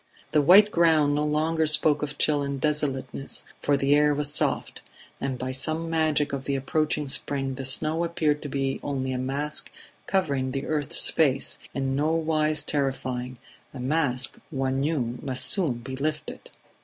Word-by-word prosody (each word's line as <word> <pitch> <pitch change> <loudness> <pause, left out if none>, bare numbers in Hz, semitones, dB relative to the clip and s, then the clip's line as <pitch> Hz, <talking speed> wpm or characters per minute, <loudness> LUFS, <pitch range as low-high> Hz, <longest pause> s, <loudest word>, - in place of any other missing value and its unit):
The 150 - +4
white 200 +8 +7
ground 160 -4 +3
no 150 +1 0
longer 155 +1 +1
spoke 150 -1 +5
of 150 0 -4
chill 150 -2 +2
and 140 -1 -3
desolateness, 135 -3 -2 0.2
for 145 -1 +2
the 140 +1 +2
air 150 0 +4
was 145 0 -1
soft; - - 0 0.4
and 135 -2 -3
by 130 +1 -4
some 160 +5 -2
magic 155 -3 +1
of 135 -1 -4
the 140 - -1
approaching 150 +2 -1
spring 135 0 -2
the 135 +1 -5
snow 155 +5 +3
appeared 155 -3 0
to 145 - -6
be 135 -1 -2
only 130 -2 -3
a 130 - -2
mask 140 +4 -1 0.4
covering 140 -9 0
the 135 0 -3
earth's 150 -3 +1
face, 140 -4 +1 0.2
in 135 -1 -1
nowise 155 0 0
terrifying 130 -3 -3 0.4
a - - -7
mask 130 -1 -1
one 135 -3 -1
knew 135 -5 -1
must 130 -1 -1
soon 175 -10 +1
be 125 +3 -7
lifted. 155 +3 -4
145 Hz, 165 wpm, -25 LUFS, 135-155 Hz, 0.4 s, white